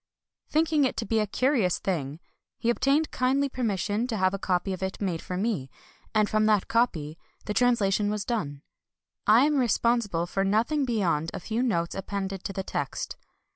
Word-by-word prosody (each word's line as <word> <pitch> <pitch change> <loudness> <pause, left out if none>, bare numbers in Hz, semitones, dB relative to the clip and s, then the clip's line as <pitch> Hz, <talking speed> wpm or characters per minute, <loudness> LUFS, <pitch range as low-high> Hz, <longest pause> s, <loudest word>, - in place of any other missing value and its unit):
Thinking 310 -1 +2
it 260 - 0
to 225 - -2
be 225 0 +1
a 210 - +1
curious 230 - +1
thing, 155 -5 -3 0.4
he 235 - +1
obtained 280 +5 +1
kindly 270 +3 +1
permission 215 -2 -1
to 225 -4 -2
have 185 0 +2
a 195 - -3
copy 190 +1 0
of 185 - -6
it 190 0 -3
made 180 -5 -2
for 180 - -5
me; 195 - -1 0.5
and 215 -1 +4
from 215 0 +2
that 210 -3 +3
copy 165 -10 0 0.3
the 210 - -2
translation 210 -3 +2
was 210 -1 -2
done. 145 - -3 0.6
I 230 +6 +7
am 295 -2 +2
responsible 230 -7 +1
for 195 +2 -1
nothing 230 +9 +1
beyond 175 - 0
a - - -4
few 220 +6 -2
notes 170 -10 0
appended 195 -1 -4
to - - -2
the 190 0 -4
text. - - -4
210 Hz, 180 wpm, -27 LUFS, 185-240 Hz, 0.6 s, I